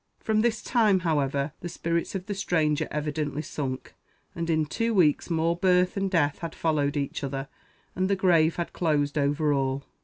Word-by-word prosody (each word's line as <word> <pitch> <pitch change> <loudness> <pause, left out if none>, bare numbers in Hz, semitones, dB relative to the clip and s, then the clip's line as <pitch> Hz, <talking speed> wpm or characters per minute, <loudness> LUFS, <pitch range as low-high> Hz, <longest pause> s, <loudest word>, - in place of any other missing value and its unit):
From 215 -1 +1
this 230 -1 0
time, 215 -6 +3
however, 145 -4 0
the 175 - -6
spirits 170 +2 -2
of 185 -1 -4
the 205 - -3
stranger 160 -6 0
evidently 150 0 -2
sunk; 135 -5 -5 0.4
and 170 0 -4
in 155 -1 +2
two 230 +8 -1
weeks 160 -5 +3
more 165 0 +1
birth 180 0 +2
and 195 -1 0
death 145 -6 +1
had 165 - -6
followed 150 -3 0
each 140 0 -3
other, 135 0 -3 0.5
and 185 +1 0
the 200 - +3
grave 170 -4 +3
had 170 - -4
closed 150 -4 0
over 145 +1 +1
all. 135 0 -1
160 Hz, 180 wpm, -27 LUFS, 145-185 Hz, 0.5 s, time